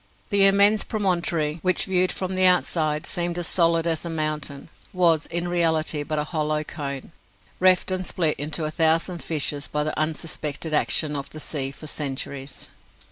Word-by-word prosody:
The 200 Hz, -1 st, +5 dB
immense 200 Hz, +2 st, +4 dB
promontory, 170 Hz, -6 st, -1 dB
which, 185 Hz, -1 st, +2 dB
viewed 185 Hz, -1 st, +2 dB
from 185 Hz, 0 st, -3 dB
the 185 Hz, 0 st, +4 dB
outside, 155 Hz, -4 st, +2 dB
seemed 175 Hz, -1 st, -1 dB
as 175 Hz, -, -3 dB
solid 165 Hz, -1 st, +2 dB
as 165 Hz, -2 st, -1 dB
a 170 Hz, -, -5 dB
mountain, 155 Hz, -2 st, -3 dB, 0.2 s
was 170 Hz, -4 st, +3 dB
in 170 Hz, +1 st, -1 dB
reality 160 Hz, -3 st, +1 dB
but 155 Hz, +1 st, -3 dB
a 150 Hz, -, 0 dB
hollow 155 Hz, -1 st, -2 dB
cone, 140 Hz, -1 st, -7 dB, 0.5 s
reft 185 Hz, 0 st, +3 dB
and 185 Hz, 0 st, -2 dB
split 160 Hz, -4 st, 0 dB
into 155 Hz, +2 st, -2 dB
a 155 Hz, -, -3 dB
thousand 165 Hz, +2 st, +2 dB
fissures 145 Hz, -2 st, -1 dB
by 150 Hz, 0 st, -1 dB
the 155 Hz, -, -3 dB
unsuspected 155 Hz, 0 st, -2 dB
action 150 Hz, 0 st, +2 dB
of 140 Hz, -1 st, -5 dB
the 155 Hz, -, -10 dB
sea 140 Hz, -3 st, 0 dB
for 140 Hz, +3 st, -11 dB
centuries. 140 Hz, -2 st, -5 dB
160 Hz, 170 wpm, -23 LUFS, 150-175 Hz, 0.5 s, The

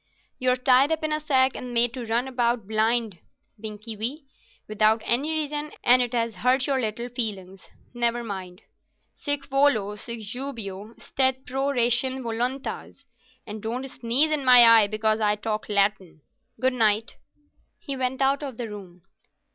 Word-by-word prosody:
"You're 255 Hz, 0 st, +2 dB
tied 255 Hz, +3 st, +3 dB
up 320 Hz, 0 st, -1 dB
in 310 Hz, 0 st, 0 dB
a 305 Hz, -, 0 dB
sack 265 Hz, -3 st, +2 dB
and 245 Hz, -1 st, -7 dB
made 235 Hz, 0 st, +5 dB
to 245 Hz, -3 st, -6 dB
run 235 Hz, +3 st, 0 dB
about 240 Hz, -4 st, -1 dB
blind, 220 Hz, -3 st, 0 dB, 0.4 s
Binkie 215 Hz, +1 st, -7 dB
wee, 255 Hz, +8 st, -5 dB, 0.4 s
without 215 Hz, +1 st, +2 dB
any 265 Hz, +6 st, 0 dB
reason, 300 Hz, -1 st, -3 dB
and 250 Hz, +1 st, +5 dB
it 245 Hz, -2 st, -1 dB
has 230 Hz, -2 st, -2 dB
hurt 255 Hz, +2 st, +2 dB
your 270 Hz, -2 st, 0 dB
little 225 Hz, +1 st, -4 dB
feelings. 200 Hz, -6 st, -6 dB, 0.2 s
Never 240 Hz, 0 st, -1 dB
mind. 190 Hz, -4 st, -8 dB, 0.5 s
Sic 290 Hz, -1 st, -1 dB
volo, 275 Hz, -7 st, +1 dB
sic 230 Hz, +2 st, -5 dB
jubeo, 220 Hz, -3 st, -6 dB
stet 260 Hz, -1 st, -1 dB
pro 270 Hz, +2 st, -2 dB
ratione 255 Hz, 0 st, +1 dB
voluntas, 245 Hz, +4 st, -4 dB, 0.4 s
and 215 Hz, 0 st, -8 dB
don't 245 Hz, +5 st, -4 dB
sneeze 260 Hz, +4 st, +1 dB
in 300 Hz, -2 st, -1 dB
my 250 Hz, -2 st, +9 dB
eye 230 Hz, -2 st, +7 dB
because 215 Hz, +1 st, 0 dB
I 210 Hz, -1 st, +2 dB
talk 215 Hz, +1 st, -4 dB
Latin. 200 Hz, -5 st, -1 dB, 0.4 s
Good 260 Hz, 0 st, +1 dB
night." 220 Hz, -2 st, +1 dB, 0.6 s
He 280 Hz, -3 st, -6 dB
went 260 Hz, +1 st, -1 dB
out 275 Hz, +2 st, +1 dB
of 270 Hz, -5 st, -7 dB
the 240 Hz, -, -4 dB
room. 185 Hz, -4 st, -11 dB
240 Hz, 160 wpm, -24 LUFS, 215-265 Hz, 0.6 s, my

